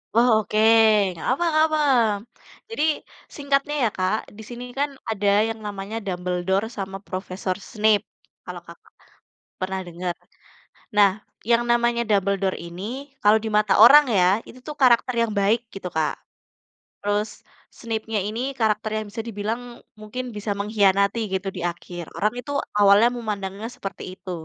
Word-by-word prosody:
Oh 235 Hz, +2 st, +5 dB
oke, 215 Hz, -, -4 dB, 0.6 s
enggak 165 Hz, -, -7 dB
apa 275 Hz, +7 st, 0 dB
enggak 310 Hz, 0 st, +4 dB
apa. 310 Hz, 0 st, 0 dB, 0.9 s
Jadi, 450 Hz, -9 st, -2 dB, 0.5 s
singkatnya 280 Hz, 0 st, 0 dB
ya 230 Hz, -, +3 dB
Kak, 185 Hz, +2 st, +1 dB, 0.2 s
di -, -, -9 dB
sini 240 Hz, 0 st, -7 dB
kan, 285 Hz, +1 st, +1 dB, 0.2 s
ada 205 Hz, -2 st, -1 dB, 0.2 s
yang 225 Hz, 0 st, -5 dB
namanya 205 Hz, +1 st, -5 dB
Dumbledore 180 Hz, +1 st, -1 dB
sama 195 Hz, -1 st, -4 dB
profesor 185 Hz, 0 st, -4 dB, 0.2 s
Snape, 215 Hz, -1 st, +2 dB, 0.4 s
kalau -, -, -7 dB
Kakak, -, -, -16 dB, 0.7 s
pernah 190 Hz, +1 st, -2 dB
dengar. 175 Hz, +1 st, -4 dB, 0.8 s
Nah, 205 Hz, -2 st, +6 dB, 0.4 s
yang 235 Hz, 0 st, +4 dB
namanya 240 Hz, 0 st, +2 dB
Dumbledore 195 Hz, -2 st, +1 dB
ini, 170 Hz, +2 st, -8 dB, 0.4 s
kalau 210 Hz, +1 st, +6 dB
di 220 Hz, -, -2 dB
mata 210 Hz, -1 st, +3 dB
orang 295 Hz, +5 st, +9 dB
ya, 180 Hz, -, +5 dB, 0.2 s
itu 255 Hz, -, -13 dB
tuh 300 Hz, -, -5 dB
karakter 250 Hz, -1 st, +4 dB
yang 230 Hz, -1 st, 0 dB
baik 205 Hz, +4 st, +3 dB, 0.2 s
gitu 195 Hz, -2 st, -5 dB
Kak. 160 Hz, -1 st, 0 dB, 0.8 s
Terus 205 Hz, +1 st, -1 dB, 0.5 s
Snapenya 225 Hz, -2 st, -3 dB
ini 220 Hz, +3 st, -4 dB, 0.2 s
karakter 215 Hz, -1 st, +1 dB
yang 215 Hz, -, -3 dB
bisa 225 Hz, -, -7 dB
dibilang, 220 Hz, +2 st, -3 dB, 0.4 s
mungkin 215 Hz, +4 st, -6 dB
bisa 210 Hz, 0 st, -3 dB
mengkhianati 200 Hz, 0 st, +2 dB
gitu 190 Hz, +1 st, -2 dB
di 185 Hz, -, -8 dB
akhir, 175 Hz, -1 st, -9 dB
orang 210 Hz, +2 st, 0 dB
itu 250 Hz, +3 st, -7 dB, 0.3 s
awalnya 205 Hz, +3 st, +6 dB
memandangnya 210 Hz, -3 st, -4 dB
seperti 195 Hz, 0 st, -7 dB
itu. 185 Hz, -, -9 dB
210 Hz, 145 wpm, -23 LUFS, 195-230 Hz, 0.9 s, orang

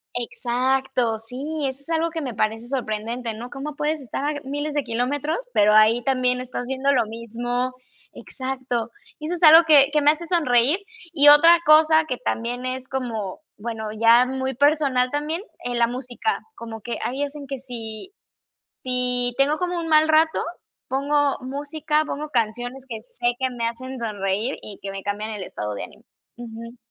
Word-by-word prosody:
exacto, 250 Hz, 0 st, 0 dB
sí, 275 Hz, +7 st, -5 dB
eso 265 Hz, +1 st, -5 dB
es 280 Hz, -, -11 dB
algo 330 Hz, 0 st, 0 dB
que 325 Hz, -1 st, -4 dB
me 255 Hz, -5 st, -5 dB
parece 225 Hz, +2 st, -1 dB
sorprendente, 230 Hz, -2 st, -3 dB
¿no?, 235 Hz, +3 st, -8 dB
cómo 280 Hz, +2 st, -6 dB
puedes 300 Hz, +1 st, -1 dB
estar 270 Hz, 0 st, -5 dB
a 295 Hz, -, 0 dB
g 290 Hz, -, -7 dB
miles 290 Hz, +2 st, -3 dB
de 290 Hz, -, +1 dB
kilómetros, 275 Hz, -, -1 dB, 0.2 s
pero 210 Hz, +1 st, +5 dB
ahí 220 Hz, +2 st, +5 dB
también 255 Hz, -2 st, +1 dB
estás 245 Hz, -1 st, -5 dB
viendo 265 Hz, +1 st, +1 dB
lo 235 Hz, -4 st, +2 dB
mismo 240 Hz, +3 st, -3 dB, 0.4 s
exacto. 255 Hz, -3 st, -4 dB, 0.3 s
Y 305 Hz, -, -8 dB
eso 330 Hz, -, -2 dB
es -, -, -9 dB
algo 320 Hz, +2 st, +9 dB
que 285 Hz, -3 st, +6 dB
que 300 Hz, 0 st, +2 dB
me 295 Hz, -, +7 dB
hace 325 Hz, +2 st, -6 dB
sonreír. 290 Hz, -3 st, +3 dB, 0.4 s
Y 290 Hz, -3 st, +7 dB
otra 330 Hz, +4 st, +8 dB
cosa 315 Hz, +1 st, +6 dB
que 250 Hz, -, -2 dB
también 245 Hz, 0 st, -3 dB
es 255 Hz, 0 st, -4 dB
como 225 Hz, -7 st, -4 dB, 0.2 s
bueno, 220 Hz, 0 st, -5 dB
ya 230 Hz, +3 st, +5 dB
muy 265 Hz, 0 st, -2 dB
personal 280 Hz, -2 st, +2 dB
también, 300 Hz, +4 st, -2 dB, 0.2 s
eh, 245 Hz, 0 st, -3 dB
la 235 Hz, -1 st, +3 dB
música, 250 Hz, -, -3 dB, 0.2 s
como 225 Hz, -2 st, -8 dB
que 240 Hz, -, -5 dB
ahí 270 Hz, +3 st, -2 dB
hacen 285 Hz, 0 st, -6 dB
que 270 Hz, -1 st, -5 dB
si, 235 Hz, -, -8 dB, 0.7 s
si 250 Hz, -1 st, +1 dB
tengo 290 Hz, +3 st, +3 dB
como 360 Hz, 0 st, -2 dB
un 330 Hz, -1 st, -4 dB
mal 310 Hz, 0 st, +5 dB
rato, 315 Hz, +1 st, +3 dB, 0.5 s
pongo 285 Hz, +1 st, +1 dB
música, 295 Hz, +3 st, -1 dB
pongo 300 Hz, +1 st, -5 dB
canciones 245 Hz, +2 st, -2 dB
que 225 Hz, -2 st, -6 dB
sé 240 Hz, +1 st, -6 dB
que 260 Hz, -1 st, 0 dB
me 235 Hz, -2 st, -1 dB
hacen 255 Hz, +2 st, -7 dB
sonreír 210 Hz, +2 st, -2 dB
y 205 Hz, -2 st, -9 dB
que 200 Hz, -, -5 dB
me 195 Hz, 0 st, -6 dB
cambian 205 Hz, +2 st, -3 dB
el 210 Hz, -3 st, -5 dB
estado 105 Hz, -, -5 dB
de 100 Hz, -, -5 dB
ánimo. -, -, -15 dB, 0.3 s
Ujú. 230 Hz, 0 st, -9 dB
255 Hz, 180 wpm, -23 LUFS, 235-290 Hz, 0.7 s, algo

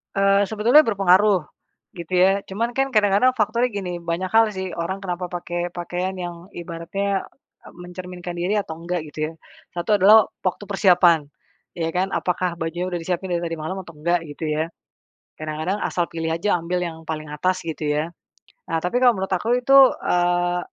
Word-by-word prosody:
Eee, 195 Hz, 0 st, +4 dB
sebetulnya 220 Hz, +9 st, +5 dB
berpengaruh, 195 Hz, -2 st, +4 dB, 0.6 s
gitu 170 Hz, +1 st, -8 dB
ya. 195 Hz, +2 st, +4 dB
Cuman 230 Hz, +5 st, -3 dB
kan 270 Hz, 0 st, +1 dB
kadang-kadang 210 Hz, +2 st, +4 dB
faktornya 235 Hz, +1 st, 0 dB
gini, 190 Hz, -3 st, -4 dB
banyak 170 Hz, +2 st, -3 dB
hal 220 Hz, +2 st, +4 dB
sih, 190 Hz, -2 st, -4 dB
orang 170 Hz, +3 st, -3 dB
kenapa 180 Hz, -2 st, -4 dB
pakai 175 Hz, 0 st, -3 dB
pakaian 180 Hz, +1 st, -3 dB
yang 175 Hz, -1 st, -5 dB, 0.2 s
ibaratnya, 180 Hz, +4 st, -3 dB, 0.4 s
eee, -, -, -13 dB
mencerminkan 180 Hz, 0 st, -7 dB
diri 185 Hz, +5 st, 0 dB
atau 170 Hz, -5 st, -5 dB
enggak, 170 Hz, -1 st, -4 dB
gitu 150 Hz, -, -11 dB
ya. -, -, -15 dB, 0.4 s
1 175 Hz, +5 st, +1 dB
adalah 205 Hz, +2 st, +7 dB, 0.2 s
waktu 195 Hz, +2 st, -2 dB
persiapan, 180 Hz, -4 st, +4 dB, 0.6 s
iya 165 Hz, -1 st, 0 dB
kan? 190 Hz, +2 st, 0 dB
Apakah 180 Hz, -2 st, -1 dB
bajunya 175 Hz, +3 st, -3 dB
udah 175 Hz, -, -2 dB
disiapin 180 Hz, +2 st, -3 dB
dari 175 Hz, -, +1 dB
tadi 170 Hz, -1 st, -3 dB
malam 165 Hz, +5 st, -5 dB
atau 170 Hz, -3 st, -11 dB
enggak, 170 Hz, +4 st, +1 dB
gitu 145 Hz, +2 st, -8 dB
ya. 155 Hz, +1 st, 0 dB, 0.7 s
Kadang-kadang 155 Hz, +5 st, -3 dB
asal 175 Hz, -4 st, -1 dB
pilih 165 Hz, -1 st, -3 dB
aja, 175 Hz, +2 st, +1 dB
ambil 175 Hz, +2 st, -2 dB
yang 170 Hz, -2 st, -4 dB
paling 155 Hz, -1 st, -5 dB
atas, 185 Hz, +5 st, -1 dB
gitu 160 Hz, -2 st, -4 dB
ya. 150 Hz, +3 st, 0 dB, 0.6 s
Nah, 165 Hz, -, +1 dB
tapi 180 Hz, +10 st, -1 dB
kalau 240 Hz, -5 st, +5 dB
menurut 190 Hz, 0 st, -1 dB
aku 230 Hz, +7 st, +1 dB
itu, 260 Hz, +2 st, +2 dB, 0.2 s
eee, 175 Hz, 0 st, +1 dB
180 Hz, 175 wpm, -22 LUFS, 170-200 Hz, 0.7 s, adalah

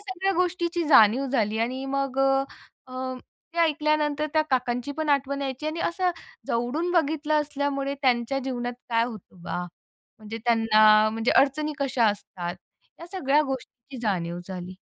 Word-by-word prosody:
सगळ्या 385 Hz, -1 st, -2 dB
गोष्टीची 345 Hz, -1 st, 0 dB
जाणीव 250 Hz, -1 st, +6 dB
झाली 220 Hz, -5 st, 0 dB
आणि 255 Hz, +4 st, -2 dB
मग 275 Hz, -1 st, -2 dB
अ, 270 Hz, 0 st, +4 dB, 0.5 s
अ, 255 Hz, 0 st, -5 dB, 0.4 s
ते 340 Hz, -, -6 dB
ऐकल्यानंतर 305 Hz, -1 st, +1 dB
त्या 310 Hz, -1 st, +3 dB
काकांची 250 Hz, +1 st, 0 dB
पण 310 Hz, +1 st, -3 dB
आठवण 280 Hz, 0 st, +1 dB
यायची 270 Hz, +2 st, -4 dB
आणि 315 Hz, +2 st, -3 dB
असं 360 Hz, +2 st, 0 dB, 0.4 s
जवळून 275 Hz, +8 st, -1 dB
बघितलं 310 Hz, -2 st, +1 dB
असल्यामुळे 280 Hz, -1 st, -2 dB
त्यांच्या 250 Hz, 0 st, +1 dB
जीवनात 245 Hz, -2 st, -3 dB, 0.2 s
काय 230 Hz, 0 st, +3 dB
होतं 215 Hz, -6 st, -10 dB
बा? 175 Hz, -, -3 dB, 0.6 s
म्हणजे 220 Hz, +1 st, -7 dB
त्यांना 215 Hz, -2 st, +5 dB
म्हणजे 225 Hz, +2 st, 0 dB
अडचणी 295 Hz, +3 st, +3 dB
कशा 260 Hz, -5 st, +1 dB
असतात, 180 Hz, -4 st, -3 dB, 0.5 s
या 335 Hz, -, -8 dB
सगळ्या 300 Hz, -6 st, +1 dB
गोष्टींची 265 Hz, 0 st, -7 dB
जाणीव 175 Hz, -5 st, -1 dB
झाली. 185 Hz, -1 st, -6 dB
270 Hz, 145 wpm, -25 LUFS, 230-305 Hz, 0.6 s, जाणीव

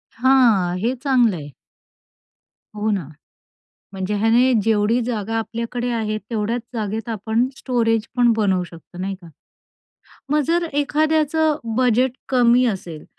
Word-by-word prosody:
हां, 230 Hz, -8 st, +3 dB
हे 235 Hz, +5 st, 0 dB
चांगलं 245 Hz, -8 st, +3 dB
आहे. 145 Hz, -1 st, -8 dB, 1.3 s
हो 210 Hz, +1 st, -1 dB
ना, 185 Hz, -8 st, -2 dB, 0.9 s
म्हणजे 190 Hz, +2 st, -3 dB
ह्याने 235 Hz, +4 st, +3 dB
जेवढी 220 Hz, +2 st, +2 dB
जागा 225 Hz, -2 st, -3 dB
आपल्याकडे 235 Hz, +2 st, -3 dB
आहे, 215 Hz, -2 st, -1 dB
तेवढ्याच 230 Hz, +1 st, -1 dB
जागेत 220 Hz, 0 st, -3 dB
आपण 225 Hz, +3 st, 0 dB
स्टोरेज 225 Hz, -3 st, 0 dB
पण 240 Hz, -1 st, +5 dB
बनवू 190 Hz, -4 st, +1 dB
शकतो, 170 Hz, +1 st, -13 dB
नाही 195 Hz, +1 st, -3 dB
का? 170 Hz, -, -13 dB, 1.0 s
मग 300 Hz, 0 st, +3 dB
जर 340 Hz, +1 st, +1 dB
एखाद्याचं 310 Hz, +1 st, +1 dB, 0.2 s
बजेट 255 Hz, 0 st, +2 dB, 0.2 s
कमी 245 Hz, -1 st, +4 dB
असेल, 175 Hz, -7 st, -4 dB
225 Hz, 125 wpm, -21 LUFS, 210-250 Hz, 1.3 s, पण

